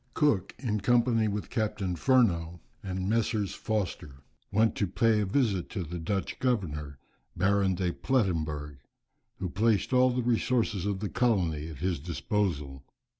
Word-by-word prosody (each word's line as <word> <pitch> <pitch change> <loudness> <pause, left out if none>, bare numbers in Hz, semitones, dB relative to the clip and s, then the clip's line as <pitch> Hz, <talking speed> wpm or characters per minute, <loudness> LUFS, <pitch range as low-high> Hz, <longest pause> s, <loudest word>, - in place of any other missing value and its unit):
Cook, 130 - +1
in 110 -4 -1
company 120 0 +3
with 105 0 -3
Captain 105 -5 -1
Furneaux, 85 -9 +2 0.2
and 95 -1 -3
Messrs. 110 -2 0
Foster, 85 -10 -3 0.3
went 110 +2 +3
to 100 - +1
pay 110 +4 +2
a 105 - 0
visit 100 -5 +1
to 95 -5 -3
the 85 +2 -6
Dutch 95 +4 -3
governor, 75 - -1 0.4
Baron 95 +1 +2
de 90 -1 0
Plettemberg, 80 - -1 0.6
who 95 - -3
placed 110 +4 +1
all 130 0 +5
the 125 0 -1
resources 115 -4 +1
of 100 -1 -2
the 105 - -2
colony 90 -11 +1
at 80 - -8
his 90 -5 0
disposal. 75 -3 -2
100 Hz, 145 wpm, -29 LUFS, 85-115 Hz, 0.6 s, all